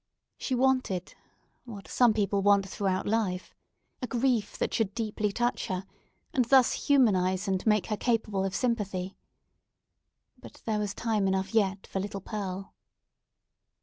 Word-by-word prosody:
She 260 - -1
wanted—what 240 -3 -3
some 245 -2 +4
people 200 -1 +1
want 200 -1 +4
throughout 190 -1 -1
life—a 210 +4 -4
grief 240 -4 0
that - - -1
should 210 -3 0
deeply 215 -2 -1
touch 240 +4 -1
her, 185 0 -3 0.5
and 255 - +3
thus 260 0 +3
humanise 190 -10 +3
and 190 -1 0
make 210 -2 +3
her 215 - -2
capable 220 -5 0
of 195 0 -2
sympathy. 200 -6 -1 1.2
But - - -14
there 215 -2 0
was 205 -1 -2
time 215 -4 0
enough 190 +2 -1
yet 195 -3 +1
for 195 - -4
little 200 0 -4
Pearl. 195 -1 -5
205 Hz, 135 wpm, -29 LUFS, 195-230 Hz, 1.2 s, some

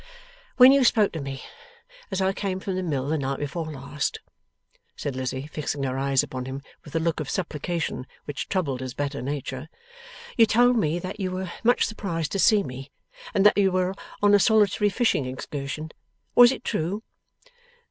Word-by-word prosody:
'When 255 +1 +9
you 275 -1 +5
spoke 215 -4 +4
to 160 - -5
me 135 -1 -6 0.7
as 190 -2 -2
I 190 0 +2
came 190 -1 -3
from 190 0 -4
the 185 - -1
Mill 140 -7 -2
the 155 +1 0
night 135 0 -2
before 155 +2 -4
last,' 140 +1 -3 0.8
said 140 -3 -4
Lizzie, 130 +1 -3
fixing 150 -2 -4
her 130 -1 -1
eyes 135 0 +2
upon 130 -1 -5
him 135 +1 -6 0.2
with 150 - -13
the 165 - +1
look 165 0 0
of 150 - -4
supplication 165 -5 -3 0.2
which 145 -2 -5
troubled 150 -10 -1
his 130 0 -6
better 145 0 -3
nature, 135 +1 -4 0.7
'you 225 -1 +7
told 245 +3 +4
me 170 -7 +1
that 185 +4 -6
you 190 -2 -1
were 185 -1 -4
much 245 +2 +4
surprised 170 -7 -3
to 195 - -1
see 210 0 +5
me, 135 -2 -8 0.5
and 195 - +3
that 210 - +6
you 195 -1 +4
were 185 0 +1 0.3
on 205 0 +6
a 205 - +7
solitary 210 0 +3
fishing 200 - +1
excursion. 145 +4 -5 0.4
Was 245 0 +8
it - - -5
true? 200 +2 -2
160 Hz, 185 wpm, -25 LUFS, 140-200 Hz, 0.8 s, When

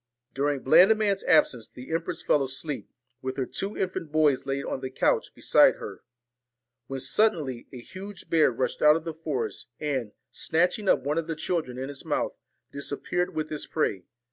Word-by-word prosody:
During 140 0 0
Blandiman's 200 +6 +5
absence 130 -8 +3
the 130 +6 -9
empress 165 +1 -3
fell 145 - +3
asleep, 135 +2 -5 0.3
with 130 +1 -4
her 130 - 0
two 195 +10 -3
infant 180 -5 -3
boys 150 -4 +2
laid 135 0 -2
on - - -3
the 130 - -4
couch 130 - +1
beside - - +5
her, - - -8 0.9
when 135 0 -4
suddenly 140 - +1
a 130 - -8
huge 190 +7 -9
bear 160 -2 +4
rushed 125 +2 -2
out 150 0 +7
of 165 - -2
the 165 -1 -4
forest, 155 -6 -4
and, 130 -8 -2 0.2
snatching 180 +5 +1
up - - +3
one 150 +4 0
of 165 - -4
the 165 - -2
children 155 -6 -2
in 130 +1 -4
its 140 -1 -7
mouth, - - -1 0.4
disappeared 160 +5 -2
with 155 0 -3
its 150 - -4
prey. 100 - -1
150 Hz, 175 wpm, -27 LUFS, 135-170 Hz, 0.9 s, out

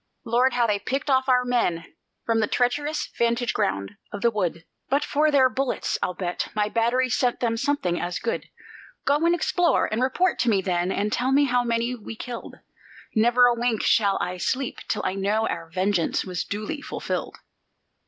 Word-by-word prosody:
Lord, 240 +3 +2
how 245 -1 +2
they 210 -2 +1
picked 270 +7 -2
off 260 0 +2
our 250 -1 +4
men, 180 -9 -1 0.3
from 225 -1 +1
the 215 - +2
treacherous 290 +7 0
vantage 235 +1 +1
ground 100 0 -2
of 205 - -6
the 235 - +3
wood! 180 -5 -2 0.2
But 280 +3 +2
for 300 +2 +2
their 275 -3 +5
bullets, 260 0 -2
I'll 180 - -1
bet, 180 -2 -3
my 210 0 +1
batteries 240 +3 +1
sent 245 -2 +1
them 230 -2 0
something 225 -9 0
as 175 0 -2
good. 230 - -3 0.6
Go 285 - +3
and 340 - +4
explore, 355 0 +2
and 220 +3 -2
report 320 +8 +1
to 240 - +2
me 205 -3 +3
then, 180 0 0
and 210 +2 -1
tell 255 +2 0
me 280 +2 +5
how 245 -3 +2
many 235 +1 0
we 225 -2 -8
killed. 240 +1 -7 0.6
Never 240 +2 +5
a 245 - +5
wink 235 -2 0
shall 200 -3 +3
I 180 +1 -3
sleep 255 +8 -2
till 210 - -1
I - - 0
know 205 +3 0
our 165 - -4
vengeance 185 0 0
was 180 -2 -3
duly 215 +9 -4
fulfilled." - - -4
235 Hz, 190 wpm, -24 LUFS, 205-255 Hz, 0.6 s, their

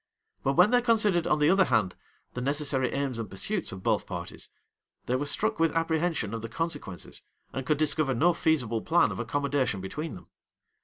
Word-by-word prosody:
But 135 - +1
when 180 +8 +5
they 245 0 +4
considered, 215 -8 +2
on 150 - +3
the 150 +2 +4
other 190 0 +5
hand, 110 -9 +1 0.4
the 125 - -4
necessary 140 -1 0
aims 135 -4 -2
and 110 -4 -5
pursuits 180 - -2
of 95 -1 -8
both - - +1
parties, - - -7 0.6
they 125 - 0
were 145 +3 -1
struck 215 +8 0
with 165 0 +2
apprehension 165 - 0
of 115 - -4
the 115 - -6
consequences, 145 - -5 0.3
and 130 -1 -4
could 150 - +2
discover 150 -3 +1
no 170 +9 +4
feasible 125 -10 +1
plan 170 +7 +3
of - - -6
accommodation 140 -7 -1
between 150 - -5
them. 90 -2 -12
145 Hz, 190 wpm, -28 LUFS, 125-165 Hz, 0.6 s, when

